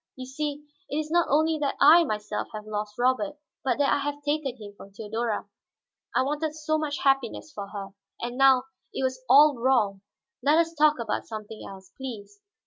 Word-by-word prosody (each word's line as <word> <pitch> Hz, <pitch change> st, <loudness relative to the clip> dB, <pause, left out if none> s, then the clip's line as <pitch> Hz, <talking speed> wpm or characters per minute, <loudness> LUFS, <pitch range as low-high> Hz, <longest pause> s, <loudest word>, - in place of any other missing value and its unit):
You 255 Hz, -, -7 dB
see, 290 Hz, +2 st, -4 dB, 0.2 s
it 290 Hz, -, -2 dB
is 310 Hz, 0 st, -3 dB
not 345 Hz, 0 st, +3 dB
only 315 Hz, +2 st, +2 dB
that 285 Hz, -2 st, -1 dB
I 320 Hz, +5 st, +8 dB
myself 210 Hz, -3 st, -3 dB
have 215 Hz, 0 st, -7 dB
lost 210 Hz, -1 st, -4 dB
Robert, 260 Hz, +5 st, +1 dB, 0.3 s
but 265 Hz, -, +1 dB
that 285 Hz, -1 st, +3 dB
I -, -, +1 dB
have 290 Hz, +1 st, -3 dB
taken 290 Hz, -3 st, -1 dB
him 205 Hz, -3 st, -10 dB
from 200 Hz, -, -13 dB
Theodora. 220 Hz, +2 st, -3 dB, 0.7 s
I -, -, +4 dB
wanted 300 Hz, +2 st, -2 dB
so 310 Hz, 0 st, -1 dB
much 295 Hz, -2 st, -3 dB
happiness 270 Hz, +1 st, +1 dB
for 200 Hz, -4 st, -6 dB
her, 200 Hz, -1 st, -7 dB, 0.3 s
and 240 Hz, +1 st, -4 dB
now 265 Hz, -1 st, +5 dB, 0.3 s
it -, -, -3 dB
was 260 Hz, 0 st, -2 dB
all 285 Hz, 0 st, +7 dB
wrong. 225 Hz, -6 st, +2 dB, 0.4 s
Let 295 Hz, +3 st, +4 dB
us 330 Hz, 0 st, +2 dB
talk 305 Hz, -1 st, +4 dB
of 230 Hz, -, -4 dB, 0.2 s
something 215 Hz, -1 st, -8 dB
else, 190 Hz, -1 st, -12 dB
please." 265 Hz, -, -8 dB
265 Hz, 190 wpm, -26 LUFS, 220-300 Hz, 0.7 s, I